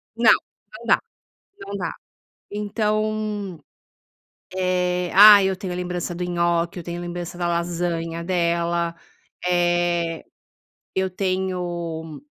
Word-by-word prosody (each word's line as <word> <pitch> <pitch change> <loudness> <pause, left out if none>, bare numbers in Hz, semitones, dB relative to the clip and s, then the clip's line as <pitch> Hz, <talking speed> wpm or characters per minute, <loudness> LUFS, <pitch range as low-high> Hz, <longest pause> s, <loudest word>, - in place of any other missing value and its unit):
Não, 230 -1 +6 0.5
não 230 - -12
dá, - - +4 0.6
não 200 - -6
dá, 175 -4 -3 0.6
então, 210 -2 -1 1.0
eh, 180 -1 0
ah, 205 0 +10
eu 190 -1 0
tenho 190 -2 -4
a - - -4
lembrança 180 -1 -3
do 180 - -3
nhoque, 170 0 0
eu - - -7
tenho 175 +1 -5
lembrança 175 0 -6
da 175 -1 -1
lasanha 170 -1 -2
dela, 170 -1 0 0.5
eh, 175 -1 +1 0.7
eu 190 0 0
tenho 175 -4 -3
175 Hz, 110 wpm, -23 LUFS, 170-190 Hz, 1.0 s, ah